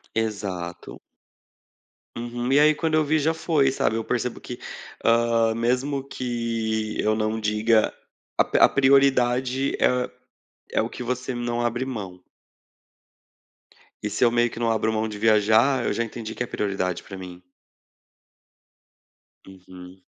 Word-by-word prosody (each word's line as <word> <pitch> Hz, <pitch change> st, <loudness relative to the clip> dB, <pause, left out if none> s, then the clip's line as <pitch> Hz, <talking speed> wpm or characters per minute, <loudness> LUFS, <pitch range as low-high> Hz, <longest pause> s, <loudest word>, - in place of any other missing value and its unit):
Exato. 100 Hz, -6 st, -4 dB, 1.2 s
Uhum. 120 Hz, +1 st, -3 dB
E 145 Hz, -, +6 dB
aí 155 Hz, +1 st, +5 dB
quando 160 Hz, 0 st, -1 dB
eu 155 Hz, 0 st, +4 dB
vi, 155 Hz, +2 st, +1 dB
já 160 Hz, +2 st, +1 dB
foi, 150 Hz, -4 st, +1 dB
sabe. 110 Hz, -, 0 dB
Eu 115 Hz, -, -2 dB
percebo 125 Hz, 0 st, -2 dB
que, 120 Hz, -, -8 dB, 0.4 s
hã, 115 Hz, -1 st, +3 dB
mesmo 130 Hz, +4 st, 0 dB
que 115 Hz, -4 st, -3 dB
eu 110 Hz, 0 st, +2 dB
não 110 Hz, 0 st, -1 dB
diga, 110 Hz, +1 st, +2 dB, 0.5 s
a -, -, +5 dB
p -, -, 0 dB
a -, -, +7 dB
prioridade 130 Hz, -1 st, +3 dB
é 125 Hz, 0 st, +2 dB, 0.6 s
é -, -, +1 dB
o -, -, -3 dB
que -, -, -9 dB
você 125 Hz, +1 st, -3 dB
não 120 Hz, 0 st, -2 dB
abre 120 Hz, +2 st, -1 dB
mão. 100 Hz, -8 st, -6 dB, 1.8 s
E 105 Hz, -, -1 dB
se 105 Hz, -, +2 dB
eu -, -, +5 dB
meio 120 Hz, 0 st, +2 dB
que 115 Hz, -, -9 dB
não 115 Hz, -, +1 dB
abro 110 Hz, 0 st, +1 dB
mão 110 Hz, 0 st, -1 dB
de 105 Hz, -1 st, -7 dB
viajar, 110 Hz, +4 st, +3 dB
eu -, -, 0 dB
já 115 Hz, -, 0 dB
entendi 110 Hz, -1 st, -7 dB
que 120 Hz, -, -2 dB
é -, -, -3 dB
prioridade 100 Hz, -5 st, -2 dB
para 95 Hz, -, -9 dB
mim. 90 Hz, -1 st, -9 dB, 2.1 s
Uhum. 90 Hz, -1 st, -13 dB
115 Hz, 150 wpm, -24 LUFS, 110-125 Hz, 2.1 s, a